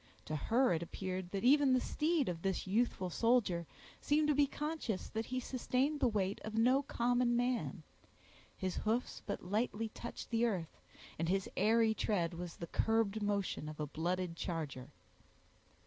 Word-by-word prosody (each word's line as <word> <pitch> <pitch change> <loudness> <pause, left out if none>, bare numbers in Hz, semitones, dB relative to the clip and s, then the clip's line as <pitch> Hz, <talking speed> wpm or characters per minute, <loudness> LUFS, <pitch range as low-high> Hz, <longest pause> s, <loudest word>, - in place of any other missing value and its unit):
To 155 - -3
her 230 - +3
it 165 - -1
appeared 185 +1 -4
that 195 +2 -3
even 275 +1 +6
the 255 - +5
steed 310 +2 +1
of 170 -2 -3
this 190 -1 -1
youthful 195 -2 0
soldier 205 -7 +2 0.3
seemed 300 +1 +2
to - - +5
be 285 0 +4
conscious 295 -9 -3
that 225 0 -3
he 255 0 -2
sustained 260 +3 0
the 260 - +4
weight 200 -3 -1
of 215 0 -5
no 255 +4 +4
common 245 -2 +1
man: 245 0 -1 0.7
his 185 -2 -2
hoofs 230 +3 -1
but 200 - -4
lightly 220 +3 -1
touched 235 +2 -8
the 230 0 +2
earth, 190 -9 -1 0.4
and 165 +1 0
his 195 +1 +1
airy 225 0 +4
tread 180 -6 0
was 170 0 -6
the 170 - -6
curbed 220 +3 +1
motion 200 -6 -1
of 155 - -9
a 150 - -1
blooded 170 +3 -2
charger. 150 -7 -4
220 Hz, 165 wpm, -35 LUFS, 180-245 Hz, 0.7 s, even